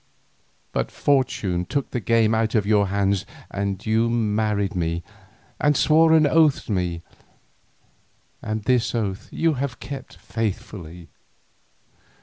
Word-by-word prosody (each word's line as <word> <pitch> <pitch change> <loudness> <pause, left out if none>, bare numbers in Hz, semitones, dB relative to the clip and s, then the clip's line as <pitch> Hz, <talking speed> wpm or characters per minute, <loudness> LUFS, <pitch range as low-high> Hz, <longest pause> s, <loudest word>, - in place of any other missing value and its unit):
But - - -1
fortune 110 -10 0
took 140 +9 -2
the 125 - -1
game 115 0 +2
out 110 0 +1
of 105 -3 +2
your 105 -1 +3
hands 100 0 +1 0.3
and 100 -1 -3
you 110 +1 +2
married 105 -3 0
me, 85 -1 -1 0.6
and 145 -2 +3
swore 160 +1 +5
an 160 -1 +6
oath 155 -1 +3
to - - -5
me, 90 -3 -1 1.4
and 110 0 -3
this 125 +1 +1
oath 100 -4 -2
you 165 -1 +1
have 130 -1 -3
kept 140 -2 -8
faithfully. 90 -6 -5
110 Hz, 130 wpm, -23 LUFS, 100-125 Hz, 1.4 s, an